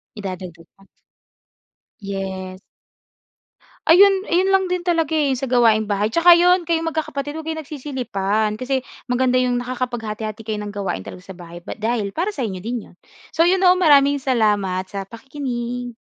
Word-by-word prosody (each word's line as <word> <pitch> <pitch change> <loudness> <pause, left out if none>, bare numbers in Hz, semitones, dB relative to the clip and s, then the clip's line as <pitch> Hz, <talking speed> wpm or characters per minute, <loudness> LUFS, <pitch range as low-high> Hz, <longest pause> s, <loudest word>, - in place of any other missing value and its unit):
Idadagdag 185 -5 -7
pa. 195 - -21 1.2
Yes. 190 -2 -5 1.2
Ayun, 385 +3 +6
ayun 370 +3 +1
lang 385 0 +3
din 360 -1 -2
talaga 330 -3 0
eh, 285 -4 +1
sa 270 - -3
gawaing-bahay, 220 -4 +2
tsaka 340 +7 +6
yun 355 +1 +4
kayong 330 0 0
magkakapatid 295 -2 -4
'wag 320 - -7
kayong 320 0 -3
nagsisilipan, 220 -8 -2
kasi 260 +1 -1 0.2
maganda 255 0 +1
yung 245 -1 +1
nakakapaghati-hati 225 -3 -4
kayo 220 -1 -4
ng 210 0 -6
gawain 195 - -4
talaga 180 - -9
sa 190 -1 -12
bahay, 170 0 -11
bat - - -8
dahil 220 -2 -1
para 365 - -2
sa 275 - -5
inyo 200 -6 -3
din 235 -1 -4
'yon. - - -21 0.3
So, 330 - +2
yun 375 +2 +3
'no, 365 0 +5
maraming 285 -5 +5
salamat 210 -8 0
sa 195 -1 -5
pakikinig. 245 0 -5
245 Hz, 155 wpm, -21 LUFS, 205-315 Hz, 1.2 s, Ayun